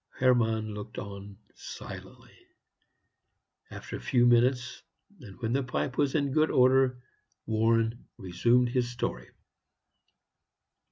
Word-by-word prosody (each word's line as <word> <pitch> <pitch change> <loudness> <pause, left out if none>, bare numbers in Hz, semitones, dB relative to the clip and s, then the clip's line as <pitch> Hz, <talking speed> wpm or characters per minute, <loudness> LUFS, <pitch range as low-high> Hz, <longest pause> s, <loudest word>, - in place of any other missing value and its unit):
Hermann 115 -4 +2
looked 105 +3 -8
on 100 -2 -8 0.2
silently. - - -11 1.3
After - - -7
a - - -12
few 120 -1 +2
minutes, 120 +1 +2 0.4
and 105 -6 -13
when 115 0 -1
the 135 - +1
pipe 130 0 -3
was 145 -1 0
in 140 -3 +1
good 155 +3 +2
order, 130 -1 +3 0.4
Warren 115 +1 0
resumed 120 +6 +2
his 125 -1 0
story. 120 0 -4
120 Hz, 110 wpm, -28 LUFS, 110-130 Hz, 1.3 s, order